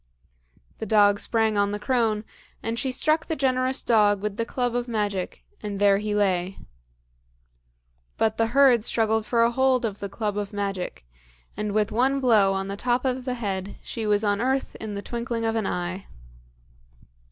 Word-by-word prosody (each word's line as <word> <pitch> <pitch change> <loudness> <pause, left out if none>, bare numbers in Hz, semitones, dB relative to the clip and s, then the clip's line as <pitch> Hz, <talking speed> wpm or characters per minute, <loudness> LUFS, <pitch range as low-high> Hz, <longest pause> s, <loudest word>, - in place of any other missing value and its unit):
The 220 - -4
dog 205 -1 +4
sprang 220 -2 +1
on 200 0 +2
the 205 - -2
crone, 225 -2 0 0.4
and 230 +1 -2
she 265 - -1
struck 310 +5 +2
the 320 - -1
generous 260 -1 +1
dog 210 -3 +3
with 210 -1 -2
the 230 +1 -2
club 245 -1 -1
of 245 0 -1
magic; 205 -5 -3 0.2
and 205 -2 -5
there 200 -1 +4
he 210 0 -2
lay. 190 -2 0 1.6
But 220 0 +1
the 225 - +2
herd 250 -2 +5
struggled 220 -1 +1
for 230 0 +3
a 235 - +3
hold 260 -1 +2
of 205 -2 -4
the 200 - -5
club 210 0 -2
of 205 0 -5
magic, 195 - -4 0.5
and 210 0 -3
with 210 0 +1
one 265 +4 +2
blow 220 -7 +4
on 195 0 -2
the 200 - -4
top 245 +4 0
of 255 -1 -1
the 255 -1 -2
head 200 -4 -4
she 225 -2 -4
was 210 0 +2
on 205 0 +1
earth 265 +2 0
in 215 -2 -6
the 200 - -5
twinkling 235 -1 -3
of 225 0 0
an 220 -3 0
eye. 180 +2 -4
220 Hz, 185 wpm, -25 LUFS, 205-245 Hz, 1.6 s, herd